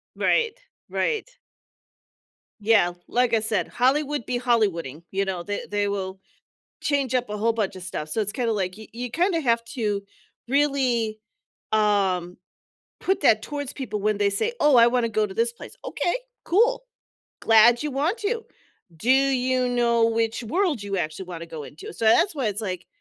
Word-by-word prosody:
Right, 465 Hz, +1 st, +1 dB, 0.3 s
right. 460 Hz, +1 st, -1 dB, 1.3 s
Yeah, 205 Hz, -5 st, +4 dB
like 245 Hz, -1 st, +2 dB
I 220 Hz, -, +3 dB
said, 220 Hz, -2 st, -1 dB
"Hollywood 280 Hz, +1 st, +1 dB
be 245 Hz, -, -1 dB
Hollywooding," 175 Hz, -, 0 dB
you 195 Hz, +1 st, +1 dB
know, 185 Hz, -3 st, -3 dB
they 205 Hz, +2 st, -4 dB
they 205 Hz, 0 st, 0 dB
will 190 Hz, -1 st, -3 dB, 0.6 s
change 275 Hz, -3 st, 0 dB
up 250 Hz, -3 st, +1 dB
a 210 Hz, -, -4 dB
whole 225 Hz, +2 st, +1 dB
bunch 210 Hz, -4 st, -2 dB
of 185 Hz, -, -9 dB
stuff, 155 Hz, -4 st, -5 dB
so 220 Hz, -, -1 dB
it's 205 Hz, 0 st, -1 dB
kind 245 Hz, -3 st, -1 dB
of 225 Hz, -, +1 dB
like 185 Hz, -2 st, -2 dB
y 220 Hz, -, -10 dB
you 245 Hz, +1 st, -5 dB
kind 355 Hz, -, +1 dB
of 325 Hz, -, 0 dB
have 230 Hz, -2 st, +2 dB
to 210 Hz, -5 st, -1 dB, 0.4 s
really, 255 Hz, -5 st, +1 dB, 0.5 s
um, 195 Hz, -5 st, +1 dB, 0.6 s
put 385 Hz, -, 0 dB
that 220 Hz, -6 st, +4 dB
towards 285 Hz, -2 st, -5 dB
people 235 Hz, -7 st, -4 dB
when 210 Hz, 0 st, +1 dB
they 200 Hz, -1 st, +2 dB
say, 445 Hz, -, 0 dB
"Oh, 295 Hz, -4 st, +5 dB
I 235 Hz, 0 st, +7 dB
wanna 240 Hz, -1 st, +1 dB
go 215 Hz, -1 st, +1 dB
to 190 Hz, -, -9 dB
this 230 Hz, +1 st, +1 dB
place," -, -, -12 dB
okay, 350 Hz, -, -1 dB, 0.3 s
cool. 475 Hz, +7 st, +2 dB, 0.6 s
Glad 230 Hz, +2 st, +6 dB
you 300 Hz, -, -2 dB
want 300 Hz, -, 0 dB
to, 455 Hz, +3 st, -2 dB, 0.5 s
do 235 Hz, +10 st, -1 dB
you 260 Hz, -2 st, +3 dB
know 235 Hz, -2 st, +3 dB
which 230 Hz, +1 st, -1 dB
world 320 Hz, -, 0 dB
you 200 Hz, -1 st, -3 dB
actually 175 Hz, +2 st, -3 dB
wanna 170 Hz, -2 st, -7 dB
go 160 Hz, -3 st, -7 dB
into, 150 Hz, +4 st, -10 dB
so 225 Hz, -, -5 dB
that's 270 Hz, -, +4 dB
why 265 Hz, -6 st, -1 dB
it's 210 Hz, +1 st, -1 dB
like, 185 Hz, -4 st, -4 dB
230 Hz, 180 wpm, -24 LUFS, 200-265 Hz, 1.3 s, I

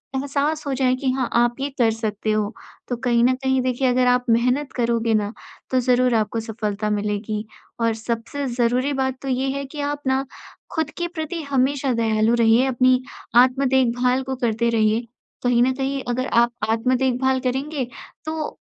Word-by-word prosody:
एहसास 285 Hz, +3 st, -1 dB
हो 275 Hz, -, 0 dB
जाए 255 Hz, -1 st, +2 dB
कि 260 Hz, 0 st, -1 dB
हाँ, 255 Hz, -2 st, -1 dB
आप 240 Hz, 0 st, +3 dB
ये 275 Hz, +1 st, -1 dB
कर 230 Hz, -2 st, +4 dB
सकते 220 Hz, -1 st, -2 dB
हो। 215 Hz, +1 st, 0 dB, 0.3 s
तो 245 Hz, -, -2 dB
कहीं 240 Hz, -1 st, +2 dB
न 255 Hz, -, +4 dB
कहीं 265 Hz, 0 st, 0 dB
देखिए 255 Hz, +1 st, 0 dB
अगर 250 Hz, 0 st, +3 dB
आप 250 Hz, 0 st, +3 dB
मेहनत 250 Hz, +5 st, +2 dB
करोगे 235 Hz, -2 st, +1 dB
ना 210 Hz, 0 st, 0 dB, 0.4 s
तो 255 Hz, -, +3 dB
ज़रूर 250 Hz, 0 st, +3 dB
आपको 220 Hz, +1 st, 0 dB
सफलता 215 Hz, -2 st, -3 dB
मिलेगी। 210 Hz, +1 st, -2 dB, 0.3 s
और 230 Hz, -1 st, +2 dB
सबसे 235 Hz, +5 st, -4 dB
ज़रूरी 250 Hz, +3 st, +1 dB
बात 265 Hz, -1 st, -1 dB
तो 275 Hz, -, -7 dB
ये 260 Hz, +1 st, 0 dB
है 280 Hz, -, -4 dB
कि 290 Hz, +2 st, -7 dB
आप 290 Hz, 0 st, -2 dB
ना 265 Hz, +1 st, +1 dB, 0.5 s
खुद 320 Hz, -3 st, 0 dB
के 345 Hz, -, -1 dB
प्रति 335 Hz, -1 st, -5 dB
हमेशा 270 Hz, 0 st, +1 dB
दयालु 220 Hz, 0 st, +2 dB
रहिए। 230 Hz, +2 st, +4 dB
अपनी 255 Hz, 0 st, +3 dB, 0.3 s
आत्म 255 Hz, +3 st, +5 dB
देखभाल 250 Hz, 0 st, +2 dB
को 265 Hz, 0 st, -3 dB
करते 235 Hz, -1 st, 0 dB
रहिए 225 Hz, +1 st, +1 dB, 0.4 s
कहीं 245 Hz, -1 st, +3 dB
न 260 Hz, -, +3 dB
कहीं 270 Hz, +1 st, -2 dB
अगर 255 Hz, +2 st, -1 dB
आप 235 Hz, +1 st, +4 dB, 0.2 s
आत्म 230 Hz, +3 st, +2 dB
देखभाल 260 Hz, 0 st, +1 dB
करेंगे 270 Hz, +3 st, -2 dB, 0.4 s
तो 315 Hz, -1 st, -2 dB
250 Hz, 180 wpm, -22 LUFS, 230-265 Hz, 0.5 s, आत्म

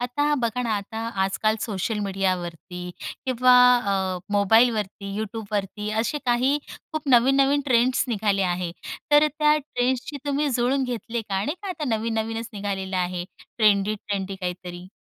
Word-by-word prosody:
आता 290 Hz, +5 st, 0 dB
बघा 235 Hz, +2 st, 0 dB
ना, 235 Hz, -, -2 dB
आता 210 Hz, +2 st, -6 dB, 0.3 s
आजकाल 205 Hz, +3 st, 0 dB
सोशल 210 Hz, +1 st, -2 dB
मीडियावरती 180 Hz, -2 st, -3 dB, 0.4 s
किंवा 255 Hz, 0 st, +4 dB, 0.2 s
अ, 190 Hz, -4 st, -1 dB
मोबाईलवरती, 205 Hz, -1 st, +2 dB
YouTubeवरती, 210 Hz, -1 st, -4 dB
असे 235 Hz, +6 st, -1 dB
काही 255 Hz, +4 st, +2 dB, 0.3 s
खूप 310 Hz, -2 st, -4 dB
नवीन-नवीन 270 Hz, +3 st, +4 dB
ट्रेंड्स 255 Hz, +1 st, +3 dB
निघाले 205 Hz, -3 st, +1 dB
आहेत. 175 Hz, -1 st, -2 dB, 0.4 s
तर 295 Hz, 0 st, +7 dB
अ, -, -, +3 dB
त्या 300 Hz, 0 st, +4 dB
ट्रेंड्सची 260 Hz, 0 st, -2 dB
तुम्ही 285 Hz, +1 st, +1 dB
जुळून 255 Hz, +2 st, +1 dB
घेतले 235 Hz, -1 st, -3 dB
का? 195 Hz, -1 st, -2 dB
नाही 295 Hz, -, -2 dB
का 400 Hz, -, -5 dB
आता 350 Hz, -5 st, -4 dB
नवीन-नवीनच 225 Hz, +1 st, -2 dB
निघालेलं 195 Hz, -2 st, -3 dB
आहे, 180 Hz, -1 st, -1 dB, 0.3 s
ट्रेंडी-ट्रेंडी, 200 Hz, -2 st, +1 dB
काहीतरी. 180 Hz, -1 st, -6 dB
220 Hz, 135 wpm, -24 LUFS, 195-250 Hz, 0.4 s, तर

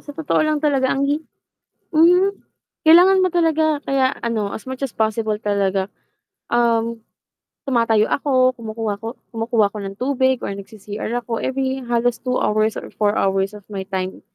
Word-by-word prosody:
sa 290 Hz, -1 st, -11 dB
totoo 320 Hz, -2 st, 0 dB
lang 310 Hz, 0 st, +1 dB
talaga 285 Hz, -3 st, +1 dB
ang 275 Hz, +1 st, +1 dB
hi 290 Hz, +2 st, 0 dB, 0.7 s
hmm, 360 Hz, +5 st, +5 dB, 0.5 s
kailangan 360 Hz, +4 st, +7 dB
mo 370 Hz, -, +1 dB
talaga, 315 Hz, -3 st, +2 dB
kaya 265 Hz, -1 st, +2 dB
ano 220 Hz, -4 st, -2 dB
as 220 Hz, -, -8 dB
much 260 Hz, +1 st, -5 dB
as 270 Hz, -, -2 dB
possible 220 Hz, -1 st, -1 dB
talaga 195 Hz, -2 st, 0 dB, 0.6 s
um, 230 Hz, -1 st, +1 dB, 0.7 s
tumatayo 230 Hz, -5 st, +2 dB
ako, 255 Hz, -2 st, +2 dB
kumukuha 220 Hz, -3 st, -5 dB
ko 225 Hz, +3 st, -6 dB, 0.2 s
kumukuha 225 Hz, -1 st, +1 dB
ako -, -, -6 dB
ng 195 Hz, 0 st, -7 dB
tubig 260 Hz, 0 st, +1 dB
or -, -, -3 dB
nag-c-CR 205 Hz, +1 st, -7 dB, 0.2 s
ako 230 Hz, -2 st, -3 dB
every 265 Hz, 0 st, -2 dB
halos 240 Hz, -1 st, 0 dB
2 250 Hz, 0 st, -1 dB
hours 215 Hz, +1 st, +1 dB
or -, -, -8 dB
4 210 Hz, 0 st, +1 dB
hours 195 Hz, +1 st, 0 dB
of 205 Hz, -, -17 dB
my 200 Hz, -2 st, -6 dB
time 190 Hz, -1 st, -4 dB
235 Hz, 165 wpm, -20 LUFS, 210-275 Hz, 0.7 s, kailangan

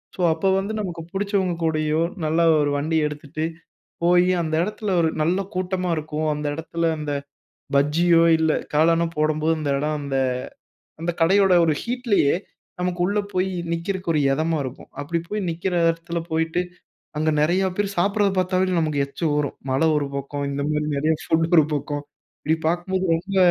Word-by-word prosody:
So, -, -, -20 dB
அப்போ 160 Hz, +4 st, -1 dB
வந்து 200 Hz, +3 st, -3 dB
நமக்கு 175 Hz, -4 st, -5 dB
பிடிச்சவங்க 195 Hz, -2 st, 0 dB
கூடயோ! 155 Hz, -1 st, +1 dB, 0.3 s
நல்லா 160 Hz, +2 st, +2 dB, 0.2 s
ஒரு 145 Hz, -, +1 dB
வண்டி 160 Hz, +3 st, 0 dB
எடுத்துட்டு 150 Hz, +1 st, -6 dB, 0.6 s
போய் 175 Hz, +1 st, +5 dB, 0.2 s
அந்த 160 Hz, -1 st, -3 dB
இடத்துல 210 Hz, +1 st, -3 dB
ஒரு 160 Hz, -, +2 dB
நல்ல 175 Hz, +4 st, +1 dB, 0.2 s
கூட்டமா 185 Hz, 0 st, -1 dB
இருக்கும். 155 Hz, 0 st, -3 dB
அந்த 150 Hz, 0 st, -3 dB
இடத்துல 165 Hz, +1 st, -1 dB
அந்த 150 Hz, -1 st, -3 dB, 0.6 s
பஜ்ஜியோ! 165 Hz, +4 st, +4 dB, 0.2 s
இல்ல 160 Hz, -1 st, +3 dB, 0.2 s
காளானோ! 165 Hz, +2 st, +4 dB
போடும்போது 155 Hz, +1 st, +1 dB
அந்த 145 Hz, -, -2 dB
இடம் 150 Hz, +1 st, -1 dB
அந்த 140 Hz, -1 st, -2 dB, 0.8 s
அந்த 175 Hz, +1 st, 0 dB
கடையோட 190 Hz, +3 st, +5 dB
ஒரு 155 Hz, -, +2 dB
ஹீட்லயே 235 Hz, -, +1 dB, 0.5 s
நமக்கு 180 Hz, 0 st, -2 dB
உள்ளே 205 Hz, +2 st, +1 dB
போய் 185 Hz, +1 st, +1 dB, 0.2 s
நிற்கிறக்கு 185 Hz, +2 st, -3 dB
ஒரு 155 Hz, -, +2 dB
இதமா 160 Hz, +3 st, 0 dB
இருக்கும். 130 Hz, -1 st, -8 dB
அப்பிடி 170 Hz, +4 st, -2 dB
போய் 210 Hz, 0 st, -2 dB
நிக்கிற 175 Hz, +3 st, -2 dB, 0.2 s
இடத்துல 165 Hz, +1 st, -3 dB
போயிட்டு, 160 Hz, +2 st, 0 dB, 0.6 s
அங்க 155 Hz, +1 st, +1 dB
நிறையா 175 Hz, +5 st, +2 dB
பேரு 205 Hz, -1 st, 0 dB
சாப்பிட்றத 200 Hz, +2 st, +2 dB
பார்த்தாவே 185 Hz, 0 st, +1 dB
நமக்கு 155 Hz, -3 st, 0 dB
எச்சி 140 Hz, +4 st, -6 dB
வரும். 150 Hz, -1 st, -1 dB
மழ 130 Hz, +1 st, +1 dB, 0.2 s
ஒரு 145 Hz, -1 st, 0 dB
பக்கம் 140 Hz, +1 st, -3 dB
இந்த 140 Hz, 0 st, -2 dB
மாரி 150 Hz, 0 st, 0 dB
நிறைய 155 Hz, +3 st, +2 dB
ஃபுட் 165 Hz, 0 st, +2 dB
ஒரு 155 Hz, -, +6 dB
பக்கம், 145 Hz, 0 st, -3 dB, 0.4 s
இப்பிடி 160 Hz, +2 st, 0 dB
பார்க்கும்போது 185 Hz, +2 st, -1 dB
ரொம்ப 190 Hz, +4 st, -3 dB
165 Hz, 160 wpm, -23 LUFS, 150-185 Hz, 0.8 s, ஒரு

